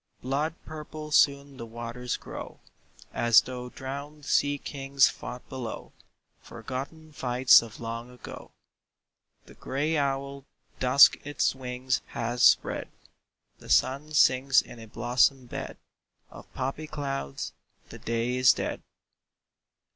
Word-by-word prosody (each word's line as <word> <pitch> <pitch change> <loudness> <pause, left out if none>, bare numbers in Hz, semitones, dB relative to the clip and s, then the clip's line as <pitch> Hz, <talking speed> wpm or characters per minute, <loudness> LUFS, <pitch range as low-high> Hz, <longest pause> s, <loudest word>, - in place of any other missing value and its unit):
Blood 145 +5 -1
purple 155 0 -8
soon 140 -2 +3
the 115 - -7
waters 120 +2 -5
grow, - - -9 0.5
As 120 -1 +5
though 125 -1 -7
drowned 140 +3 -8
sea 145 0 +2
kings 135 -2 +2
fought 125 0 -8
below 125 -4 -7 0.5
Forgotten 135 +7 -7
fights 125 -2 +5
of 115 -1 -11
long 115 +1 -5
ago. 125 0 -11 1.0
The - - -15
gray 150 +4 -2
owl 140 0 -2 0.4
Dusk 130 +2 +7
its 145 0 0
wings 125 -1 -2
has 120 +1 -3
spread; - - +4 0.7
The - - -14
sun 140 +4 +2
sinks 135 -1 +5
in 120 - -7
a 115 - -10
blossom 125 +4 +1
bed 120 - -7 0.5
Of - - -13
poppy 135 +4 -3
clouds; 135 - -4 0.4
the - - -10
day 115 +2 -1
is 130 -2 +6
dead. - - -4
130 Hz, 120 wpm, -27 LUFS, 125-140 Hz, 1.0 s, Dusk